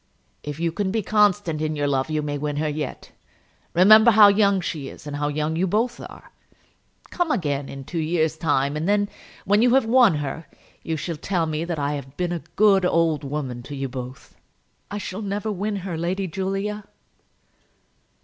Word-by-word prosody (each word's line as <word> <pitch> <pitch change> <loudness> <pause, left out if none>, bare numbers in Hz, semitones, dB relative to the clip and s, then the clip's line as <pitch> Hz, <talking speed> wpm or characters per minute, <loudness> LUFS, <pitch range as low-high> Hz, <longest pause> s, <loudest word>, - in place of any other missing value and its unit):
"If 150 +1 -6
you 170 0 0
can 195 +3 -2
be 220 +2 -1
constant 205 -6 +2
in 155 0 -1
your 145 -1 -1
love 135 +1 0
you 155 -1 -1
may 145 -1 -3
win 145 0 -3
her 155 +1 -1
yet. 150 -2 -5 0.6
Remember 215 +6 +8
how 210 -2 +8
young 200 -1 +3
she 155 -6 -4
is; - - -13
and 145 -1 -5
how 145 0 -1
young 150 +2 -1
you 180 +3 +1
both 225 +6 0
are. - - -12 0.8
Come 350 -2 -1
again 145 - -1
in 135 0 -8
two 165 +5 -4
years' 160 0 0
time, 145 -3 0
and 160 +5 -2
then, 205 0 +2 0.4
when 205 +2 +3
you 245 +1 +4
have 270 - +3
won 235 -6 +5
her, 150 +2 -5 0.3
you 160 -1 -3
shall 165 +1 -4
tell 175 +1 -1
me 155 +1 -2
that 170 -2 -3
I 145 0 -1
have 140 -1 -7
been 180 -1 -1
a 170 -2 -3
good 200 -2 +4
old 165 -4 +1
woman 135 -4 -4
to 140 +4 -8
you 135 0 -3
both." 125 0 -8 0.5
"I 205 - -4
shall 205 0 -5
never 205 +1 -3
win 205 +2 -2
her, 180 -4 -3
Lady 180 +4 -2
Julia." 195 +3 -3
165 Hz, 195 wpm, -23 LUFS, 150-200 Hz, 0.8 s, Remember